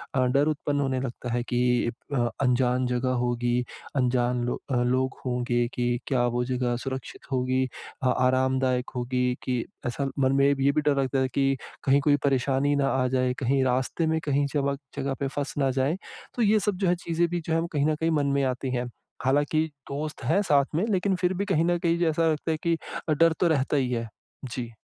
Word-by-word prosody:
अ, 130 - +3
डर 140 +4 +2
उत्पन्न 145 -1 -1
होने 130 -1 0
लगता 125 -1 -5
है 120 - +1
कि 125 -1 +1 0.2
अ, 120 -3 +2
अनजान 125 -1 +2
जगह 125 +1 0
होगी, 120 0 0 0.3
अनजान 125 -1 +1
लो 125 - -3
अ, - - +1
लोग 130 +2 0
होंगे 120 -1 0
कि 120 0 0
क्या 125 -3 +2
वो 125 - +1
जगह 125 -1 -1
सुरक्षित 135 +1 -7
होगी 130 0 +1 0.4
अ, - - +3
आरामदायक 130 0 +1
होगी 125 0 0
कि 125 -2 -1 0.2
ऐसा 135 +3 -2
मन 130 -1 +3
में 140 - +5
ये 140 0 +3
भी 150 +1 +1
डर 145 -1 +1
लगता 135 0 0
है 130 - +2
कि 135 -1 +2 0.3
कहीं 140 +1 +4
कोई 145 0 +4
परेशानी 135 +1 +2
ना 140 -1 +2
आ 130 -1 +1
जाए, 125 -1 +1
कहीं 135 +1 +2
रास्ते 130 +4 0
में 160 0 +1
कहीं 145 0 +2
जमक 140 -1 0 0.2
जगह 140 -1 -2
पे 140 - 0
फँस 140 +1 -4
ना 135 -2 +2
जाएँ, 135 +6 0 0.4
तो 245 - -1
ये 215 -1 +4
सब 205 -3 -1
जो 190 - +2
है 175 - +3
चीज़ें 170 0 0
भी 175 0 -1
जो 160 - -1
है 165 - +2
कहीं 145 -2 +1
न 155 - +2
कहीं 165 +1 0
मन 145 -2 +1
में 140 - +2
आती 130 0 -1
हैं। 125 0 -1 0.4
हालाँकि 145 +4 +2 0.3
दोस्त 150 +2 -4
हैं 200 - +2
साथ 145 -8 +3
में 180 +7 +2
लेकिन 190 -1 +1
फिर 180 +1 0
भी 200 +2 -2
कहीं 170 -5 +2
न 175 0 +2
कहीं 170 0 +1
जो 170 - +2
ऐसा 160 +1 +2
लगता 155 +2 -2
है 155 - 0
कि 170 -1 +2 0.3
अ, - - +3
डर 165 +2 +4
तो 180 - +3
रहता 150 -3 +1
ही 130 -2 0
है। 115 -2 -2 0.4
जी। 120 -1 -5
135 Hz, 215 wpm, -26 LUFS, 125-150 Hz, 0.4 s, में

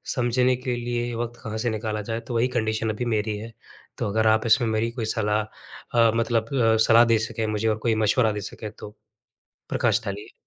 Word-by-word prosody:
समझने 125 +1 +2
के 125 -1 -3
लिए 120 0 -3
वक़्त 120 0 -4
कहाँ 110 -1 -4
से 120 +2 -1
निकाला 110 -1 -3
जाए? 115 +2 -4
तो 120 - -8
वही 120 +2 +3
कंडीशन 110 0 -1
अभी 110 +3 -2
मेरी 110 -2 -1
है। 115 +2 -8 0.5
तो - - -2
अगर 110 +2 +1
आप 110 +1 +3
इसमें 115 +1 +4
मेरी 110 +1 0
कोई 120 -2 -4
सलाह 105 -1 +1 0.6
अ, 115 -1 +6
मतलब 115 +1 0
अ, 115 -3 +3
सलाह 115 +1 +7
दे 115 -1 +3
सकें 110 - -3
मुझे 110 +1 -1
और 110 - 0
कोई 110 - +3
मशवरा 110 +1 +3
दे 105 - -4
सकें 105 -2 -8
तो 105 0 -10 0.7
प्रकाश 115 - +1
डालिए। 100 +1 -6
115 Hz, 205 wpm, -24 LUFS, 110-120 Hz, 0.7 s, सलाह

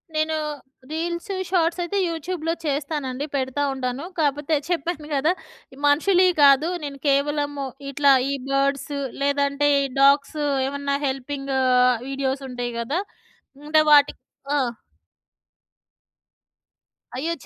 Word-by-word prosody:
నేను 310 +1 +1 0.6
reels, 340 +5 -3 0.2
shorts 340 -1 +1
అయితే 345 +4 -2
యూట్యూబ్‌లో 330 0 -3
చేస్తానండి. 285 -2 -2
పెడతా 265 +1 -1
ఉంటాను. 255 +1 -3 0.2
కాపోతే 295 +1 +1
చెప్పాను 330 -2 -2
కదా 290 +5 +2 0.4
ఈ - - -15
మనుషులివి 360 +5 +4
కాదు. 280 +3 +6
నేను 280 -1 -6
కేవలము 285 0 0 0.2
ఇట్లా 280 +1 +4 0.2
ఈ - - 0 0.2
బర్డ్స్ 275 +1 0 0.3
లేదంటే 280 0 +1
ఈ - - 0 0.2
డాగ్స్ 280 +2 +4 0.3
ఏమన్నా 280 0 -2
హెల్పింగ్ 275 +1 -4
ఆహ్, 250 -1 +4
వీడియోస్ 270 0 -2
ఉంటాయి 245 -1 -4
కదా! 275 +9 -1 0.7
అంటే 310 0 +5
వాటికి 290 -1 +4 0.3
ఆ! - - +3 2.6
అయ్యో! 315 +6 -2
ఛ! - - -15
285 Hz, 115 wpm, -23 LUFS, 275-315 Hz, 2.6 s, కాదు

